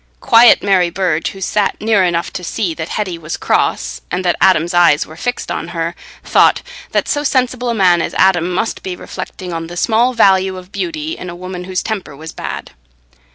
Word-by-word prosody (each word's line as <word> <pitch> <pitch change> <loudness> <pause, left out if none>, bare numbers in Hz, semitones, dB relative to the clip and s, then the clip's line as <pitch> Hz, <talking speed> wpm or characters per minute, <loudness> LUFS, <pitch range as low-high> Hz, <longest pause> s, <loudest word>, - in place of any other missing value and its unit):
Quiet 230 - +6
Mary 185 -3 +3
Burge, 170 -3 -1
who 195 - -11
sat 205 +1 0
near 215 -3 +2
enough 170 -1 -1
to 180 - -5
see 175 0 -2
that 160 0 -6
Hetty 185 -5 -3
was 155 0 -5
cross 60 0 0
and 185 - -3
that 175 - +2
Adam's 175 -2 +3
eyes 170 -4 +4
were 155 - -12
fixed 245 +8 -3
on - - -3
her, 170 -1 -3 0.3
thought - - +3 0.3
that - - 0
so 290 - 0
sensible 255 -3 0
a 235 - 0
man 180 -4 +4
as - - -4
Adam 180 -2 +3
must 185 +5 -2
be 185 -1 -5
reflecting 180 0 -7
on 165 0 -4
the 175 +1 -8
small 235 +6 +2
value 190 -3 +3
of 185 +1 -12
beauty 320 -2 -3
in 180 - -8
a 175 - -7
woman 180 0 -7
whose 185 -1 -2
temper 195 -9 -4
was 160 +2 -9
bad. - - -6
185 Hz, 200 wpm, -16 LUFS, 170-210 Hz, 0.3 s, Quiet